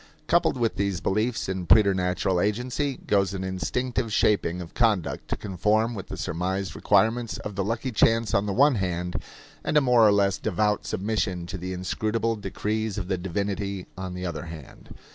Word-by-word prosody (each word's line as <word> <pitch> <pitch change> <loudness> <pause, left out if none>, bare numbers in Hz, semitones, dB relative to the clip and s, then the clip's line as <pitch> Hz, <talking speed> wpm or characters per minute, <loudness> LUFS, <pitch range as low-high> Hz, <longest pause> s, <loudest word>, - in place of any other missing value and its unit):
Coupled - - +2
with 115 -2 0
these 100 -3 0
beliefs 110 +6 0
in 95 -2 -3
preternatural 95 0 +3
agency 125 +7 -1
goes 100 -1 +2
an 95 - -3
instinctive 115 +6 -2
shaping 100 -5 +2
of 85 -2 -8
conduct 110 -7 +1
to - - -1
conform 105 +4 +1
with 100 -5 -7
the - - -6
surmised 95 +4 -2
requirements 110 +3 +2
of 105 - -6
the 100 0 -1
lucky 115 +5 -2
chance 115 +1 +3
on 100 +1 +2
the - - 0
one 140 +6 +5
hand, 90 -1 -2 0.5
and 150 - +1
a - - +9
more 125 -5 +5
or - - +6
less 100 -1 +2
devout 105 +1 0
submission 95 -3 -1
to 95 - -6
the 90 +2 -5
inscrutable 110 +5 -1
decrees 110 0 -3
of 95 -3 -4
the 95 - +1
divinity 100 +1 -3
on 95 -1 -5
the 90 0 -4
other 90 - -4
hand. 80 -4 -11
100 Hz, 180 wpm, -26 LUFS, 95-110 Hz, 0.5 s, a